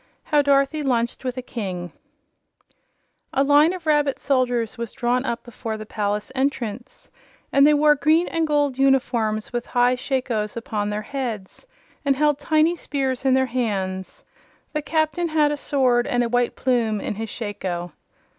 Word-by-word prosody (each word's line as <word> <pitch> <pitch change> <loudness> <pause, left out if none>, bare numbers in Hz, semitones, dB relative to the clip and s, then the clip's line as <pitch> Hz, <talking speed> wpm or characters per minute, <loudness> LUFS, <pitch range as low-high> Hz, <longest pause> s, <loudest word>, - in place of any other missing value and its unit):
How 295 -2 +3
Dorothy 280 +2 +2
Lunched 240 -3 -1
With 255 -1 -3
a 255 - -4
King 185 -8 -5 1.4
A 275 - +3
line 290 +3 +5
of 365 -3 -7
rabbit 295 -3 +2
soldiers 245 -4 0
was 235 -2 -5
drawn 245 +2 0
up 235 -2 -3
before 225 -2 -6
the 215 - -8
palace 210 +1 -2
entrance, 255 -4 -3 0.4
and 275 +1 +6
they 300 - +5
wore 300 0 +5
green 310 +4 +2
and 330 -1 0
gold 290 -3 +1
uniforms 245 -6 +1
with 240 0 -3
high 245 0 +3
shakos 250 -5 -2
upon 210 -3 -2
their 210 +1 -3
heads 245 - -5 0.4
and 280 -1 +2
held 295 0 +2
tiny 310 +3 +2
spears 270 -5 -2
in 260 -1 +4
their 265 0 +3
hands. 205 - -3 0.5
The 305 - -1
Captain 315 +3 0
had 305 -2 +2
a - - 0
sword 255 -4 +2
and 245 0 +1
a 235 - -1
white 245 0 +1
plume 235 -5 +1
in - - -3
his 220 +2 -5
shako. 185 -6 -4
255 Hz, 165 wpm, -23 LUFS, 225-290 Hz, 1.4 s, and